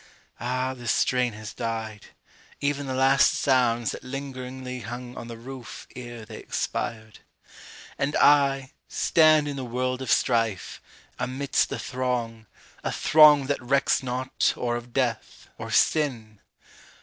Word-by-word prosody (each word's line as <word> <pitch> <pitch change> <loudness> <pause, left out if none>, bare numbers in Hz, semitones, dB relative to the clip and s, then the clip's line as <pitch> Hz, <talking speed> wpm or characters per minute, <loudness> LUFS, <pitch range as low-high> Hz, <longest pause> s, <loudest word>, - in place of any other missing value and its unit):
Ah, 130 +2 -1
the 120 -2 -9
strain 125 +1 +2
Has 110 0 -8
died 110 -2 -5 0.5
ev'n 145 0 -1
the 130 - -2
last 135 +1 +4
sounds 120 -4 +2
that - - -8
lingeringly 130 -1 -6
Hung 120 +2 -7
on 120 - -7
the 115 -1 -8
roof 130 +1 -9
ere 120 -3 -8
they 110 -1 -9
expired! 110 -2 -4 0.8
And 140 +2 0
I, 140 -2 +4 0.2
Stand 155 -2 +4
in 140 -1 -4
the 135 - -4
world 130 +1 -2
of 130 - -5
strife, 115 -5 0 0.4
amidst 135 +2 0
a - - -2
throng, 120 -3 -3 0.4
A - - -1
throng 150 -3 +6
that 140 0 -1
recks 135 +3 +2
not 130 0 -1
or 120 -1 -1
of 120 0 -7
death, 120 -3 -2
or - - -6
sin! 115 -9 +1
125 Hz, 135 wpm, -26 LUFS, 115-135 Hz, 0.8 s, throng